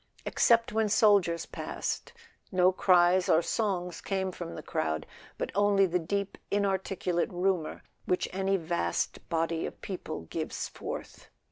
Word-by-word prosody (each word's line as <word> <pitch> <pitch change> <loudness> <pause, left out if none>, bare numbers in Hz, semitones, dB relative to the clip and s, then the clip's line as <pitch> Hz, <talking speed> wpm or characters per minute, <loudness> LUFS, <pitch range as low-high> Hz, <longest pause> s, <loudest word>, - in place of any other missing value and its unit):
Except 230 -2 +3
when 220 0 +2
the - - -4
soldiers 200 -7 +4
passed - - -4 0.4
no 185 -1 +5
cries 180 0 +4
or 165 -1 +5
songs 180 -4 -1
came 190 -1 -1
from 85 - -7
the - - -7
crowd, 80 0 -2 0.3
but - - -3
only 200 0 +4
the 180 0 0
deep 200 +4 -3
inarticulate 190 -3 0
rumour 180 -3 -1 0.2
which 180 - +1
any 195 +1 +1
vast 170 0 -1
body 165 -1 0
of - - -10
people 180 - -5
gives 80 - -4
forth. - - -7
185 Hz, 140 wpm, -29 LUFS, 170-200 Hz, 0.4 s, no